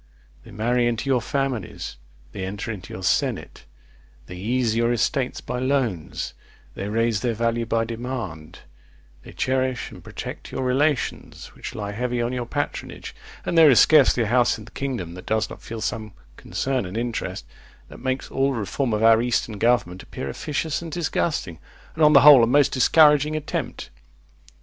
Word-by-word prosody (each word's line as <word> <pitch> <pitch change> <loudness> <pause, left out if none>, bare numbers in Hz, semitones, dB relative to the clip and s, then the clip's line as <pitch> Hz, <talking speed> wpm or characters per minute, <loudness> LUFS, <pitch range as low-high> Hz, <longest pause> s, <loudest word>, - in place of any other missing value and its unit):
They - - -14
marry 120 +3 +1
into 120 +4 -1
your 125 -2 +3
families; 135 - -3 0.4
they 95 - -6
enter 100 +4 -4
into 95 -4 -8
your 95 - -7
senate; - - -1 0.6
they 90 - -9
ease 115 +4 0
your 115 +1 +2
estates 125 +2 0
by 125 +1 -4
loans; 125 - -1 0.4
they 100 +8 -5
raise 115 0 +1
their 120 +1 -1
value 115 0 0
by 115 0 +1
demand; 115 -9 -6 0.6
they - - -12
cherish 130 -1 -1
and - - -12
protect - - -8
your 130 - -3
relations 135 +2 -1
which - - -8
lie 100 -1 -4
heavy 125 +3 -2
on 120 +1 -1
your 125 -2 -3
patronage; - - -4 0.3
and - - -1
there 160 -2 +8
is 125 - +6
scarcely 140 -5 +5
a - - -1
house 120 +2 +2
in 110 - -11
the 115 - -15
kingdom 120 -13 -4
that 90 +1 -11
does 110 0 0
not - - -10
feel 115 -1 -7
some 110 -3 -4 0.2
concern 130 -7 -2
and 95 +5 -6
interest, 120 0 -3 0.4
that - - -12
makes 130 +1 -3
all 135 +1 +1
reform 115 +2 -2
of 105 +1 0
our 115 0 +6
eastern 115 -3 -1
government 115 -6 +1
appear 70 - -7
officious 150 - -3
and 165 -1 -7
disgusting; 155 - -2 0.3
and, 160 - 0
on 150 0 +7
the 140 - +8
whole, 145 -5 +9
a - - +4
most 140 +3 +4
discouraging 150 +3 +5
attempt. 155 -1 -4
120 Hz, 175 wpm, -23 LUFS, 110-135 Hz, 0.6 s, whole